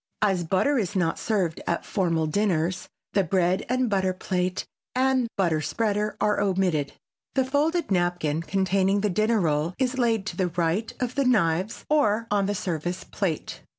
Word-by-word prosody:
As 190 -4 +2
butter 220 - +2
is 200 -2 -2
not 170 -3 0
served 185 -7 -1
at 170 - -1
formal 165 -5 0
dinners 180 0 0 0.2
the 195 - +3
bread 180 +1 +1
and 255 0 +1
butter 190 -3 +1
plate 185 -1 -2 0.3
and 260 -1 +2
butter 170 -5 +2
spreader 210 +3 -1
are 210 -1 +2
omitted. 185 -7 0 0.4
The 265 -1 +3
folded 300 - 0
napkin 175 -4 +1
containing 195 +2 +1
the 210 -1 +1
dinner 215 +4 +2
roll 160 0 0
is 260 0 0
laid 225 -4 +1
to 180 - -4
the 185 - +1
right 175 +5 -1
of 250 -1 -2
the 275 0 +1
knives 190 -4 +1
or 230 -7 +2
on 200 -2 +2
the 205 - -1
service 175 -1 -3
plate. 180 -7 -3
195 Hz, 165 wpm, -25 LUFS, 175-220 Hz, 0.4 s, the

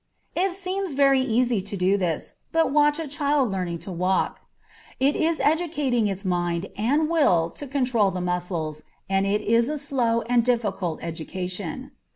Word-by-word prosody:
It 370 +1 +1
seems 380 -2 -3
very 275 -1 +4
easy 240 -3 +1
to 200 +1 -5
do 185 +2 +3
this, 175 -5 -2 0.2
but 325 -2 +2
watch 295 0 +4
a 325 -2 -4
child 285 -4 +1
learning 180 -3 -2
to 195 - -6
walk; 185 +2 0 0.6
it 275 +2 +3
is 325 0 +1
educating 295 -8 +1
its 195 0 -4
mind 175 0 -1
and 280 +9 +1
will 180 - +3
to 290 - -8
control 250 -6 +2
the 185 - -4
muscles, 175 -4 -2 0.3
and 195 0 +1
it 205 +1 +1
is 230 +3 +2
a 305 - -2
slow 245 -5 0
and 240 +1 +2
difficult 205 -8 -1
education. 180 - -5
230 Hz, 165 wpm, -25 LUFS, 185-285 Hz, 0.6 s, very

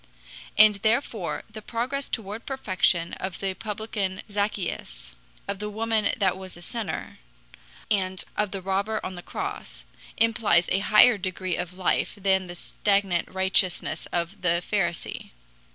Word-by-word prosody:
And 215 -1 +8
therefore 220 - 0
the 215 -1 -9
progress 250 +6 -2
toward 215 0 -4
perfection 185 -9 +1
of 190 -1 -4
the 195 -1 0
publican 210 -2 -3
Zaccheus, 205 +1 -3 0.3
of 200 -1 -3
the 210 0 -3
woman 220 0 +1
that 195 -5 +2
was 190 -2 -9
a - - -11
sinner, 225 +2 -4 0.7
and 190 -2 +1
of 210 -1 +1
the 190 -1 -6
robber 200 +3 0
on 185 - -4
the 175 - -8
cross, - - -6 0.3
implies 225 -6 +3
a 190 - +3
higher 210 +2 +6
degree 185 -1 -2
of 180 +1 -5
life 185 - +1
than 190 -1 +2
the 175 - -7
stagnant 195 -1 +1
righteousness 190 -3 +1
of 175 +3 -3
the 170 -1 +2
Pharisee. 175 -5 -1
195 Hz, 140 wpm, -26 LUFS, 185-215 Hz, 0.7 s, And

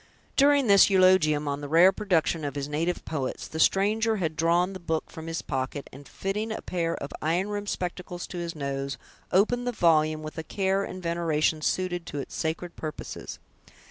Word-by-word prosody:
During 285 0 +5
this 200 -2 +7
eulogium 185 -6 +4
on 140 0 -2
the 145 - -5
rare 170 +5 +7
production 170 -6 0
of 145 -1 -3
his 140 -1 -3
native 165 +4 -2
poets, 140 -5 -3
the 160 - -6
stranger 215 +6 +3
had 165 -6 -2
drawn 170 +4 +2
the 190 - -7
book 160 -2 -3
from 160 0 -8
his 165 0 -3
pocket, 135 +1 -3
and 140 +2 -12
fitting 210 +3 -3
a 220 - -5
pair 170 -2 -1
of 140 - -6
iron 175 +6 0
rimmed 205 0 -3
spectacles 180 0 -4
to 180 - -7
his 170 -1 -4
nose, 140 -1 -3 0.3
opened 245 +6 +2
the - - +1
volume 155 -6 +2
with 155 +1 -6
a - - -4
care 195 +2 0
and 185 -1 -7
veneration 165 -2 0
suited 175 +1 -1
to - - -5
its 140 - -5
sacred 165 +2 -3
purposes. 155 -2 -6
170 Hz, 190 wpm, -27 LUFS, 155-190 Hz, 0.3 s, this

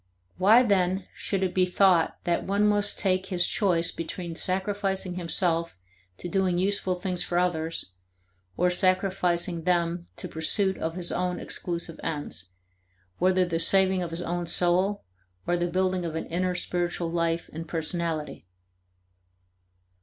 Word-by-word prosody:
Why 220 +7 +6
then 190 -3 +1
should 195 -2 -2
it 185 - -1
be 185 -1 +3
thought 180 -2 +3
that 170 -1 0
one 200 +2 +1
must 205 0 +1
take 185 -1 0
his 180 -2 +1
choice 175 -5 +1
between 165 +1 -5
sacrificing 190 0 -1
himself 170 - +1 0.4
to - - -6
doing 185 -1 +1
useful 190 0 0
things 180 -1 -1
for 175 - -1
others, 165 - -1 0.7
or 180 +1 +2
sacrificing 180 -2 +1
them 170 0 0
to - - -6
pursuit 190 +5 0
of 160 +1 -3
his 180 -1 -1
own 180 0 -1
exclusive 170 -2 -4
ends, 145 - -4 0.7
whether 185 0 +3
the 165 -2 -2
saving 190 +2 +3
of 175 - -3
his 165 +2 -3
own 175 0 -3
soul 185 +4 +3 0.4
or 175 - +1
the 175 0 0
building 185 +1 0
of 165 -2 -4
an 160 - -3
inner 180 +2 -1
spiritual 175 -1 -2
life 170 0 -1
and 165 +1 -6
personality? 160 - -3
180 Hz, 145 wpm, -27 LUFS, 170-190 Hz, 0.7 s, Why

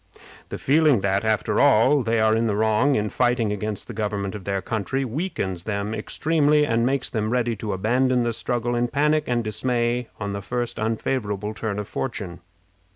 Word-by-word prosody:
The - - -5
feeling 145 -5 +3
that, 100 +1 +1
after 110 -1 +1
all, 140 +1 +5
they 115 -1 0
are 110 0 +3
in 115 +1 +1
the 105 - 0
wrong 110 +6 +2
in 105 0 0
fighting 120 -3 +1
against 105 0 -4
the - - -7
government 105 -2 -2
of 105 -4 -8
their 100 -1 -1
country, 110 +7 -2
weakens 115 - -3
them 105 0 -2
extremely, 150 +3 +2
and 115 -3 +1
makes 135 -1 -1
them 110 -2 -1
ready 120 -1 0
to 105 0 -4
abandon 125 +6 +1
the 120 0 -1
struggle 120 +1 -2
in 120 0 +1
panic 150 +3 +1
and 120 -1 0
dismay 120 +2 -1
on 100 -1 -3
the 100 - -4
first 120 +4 -3
unfavorable 110 -2 -2
turn 110 -2 -3
of 105 -1 -4
fortune. 100 -6 -4
115 Hz, 185 wpm, -23 LUFS, 105-125 Hz, -, all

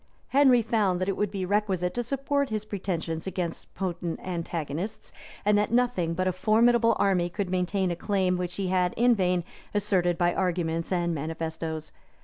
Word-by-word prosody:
Henry 260 -3 +5
found 205 -5 +1
that 185 - -1
it 195 - 0
would 210 - 0
be 195 -2 -3
requisite 190 -3 0
to 240 - -1
support 275 +3 -1
his 215 -1 -3
pretensions 175 -5 -3
against 180 -3 -4
potent 175 -3 -3
antagonists; 170 0 -4 0.3
and 210 0 +4
that 210 - 0
nothing 235 -9 +1
but 185 +1 0
a - - +3
formidable 230 +4 +4
army 180 -3 +2
could 180 +1 -3
maintain 185 0 0
a - - -1
claim 190 0 +1
which 180 -1 -3
he 195 -2 -2
had 180 -1 +1
in 245 +1 +5
vain 180 -4 +1 0.3
asserted 190 -4 +2
by 175 0 +2
arguments 170 -3 -1
and 175 -2 +1
manifestoes. 160 0 -4
185 Hz, 170 wpm, -27 LUFS, 175-210 Hz, 0.3 s, Henry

